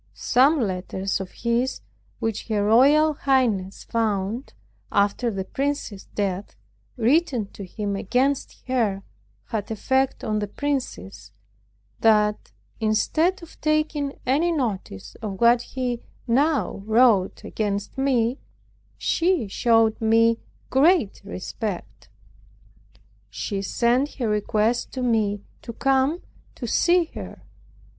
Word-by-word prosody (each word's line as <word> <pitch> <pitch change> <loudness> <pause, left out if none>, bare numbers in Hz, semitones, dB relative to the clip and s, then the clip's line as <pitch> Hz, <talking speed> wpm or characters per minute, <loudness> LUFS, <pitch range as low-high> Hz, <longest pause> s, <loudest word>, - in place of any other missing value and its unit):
Some 280 +5 +3
letters 190 -2 -2
of 190 - -6
his, 235 +2 -1 0.4
which 225 -2 -3
her 210 -3 0
royal 285 +8 +5
highness 240 -10 0
found 220 +1 -2 0.4
after 205 +4 +2
the 195 -3 -3
prince's 275 -6 -3
death, 200 -1 -3 0.4
written 250 -1 +2
to 200 - -9
him 200 +2 -4
against 255 +8 -1
her, 220 -7 0 0.5
had 210 -3 -3
effect 265 +4 0
on 215 -1 0
the 205 - -2
princess, 100 - -4 0.7
that, 210 -1 +2 0.3
instead 310 - +1
of 330 - -14
taking 305 -2 0
any 300 +7 +2
notice 190 - -3
of 200 -4 -5
what 235 0 +5
he 245 -2 -3 0.2
now 275 -2 +1
wrote 220 -4 +3
against 205 -2 -3
me, 260 -2 +1 0.6
she 340 - +1
showed 225 +2 +2
me 230 +1 +4 0.3
great 285 - +3
respect. 200 0 -6 1.2
She 200 -2 -3
sent 240 +7 +1
her 245 -5 -2
request 215 +2 0
to 255 - -3
me 210 -4 +1 0.2
to 235 - -7
come 270 +6 +1 0.3
to 245 - -6
see 345 +9 +3
her. - - -8
230 Hz, 110 wpm, -24 LUFS, 205-270 Hz, 1.2 s, royal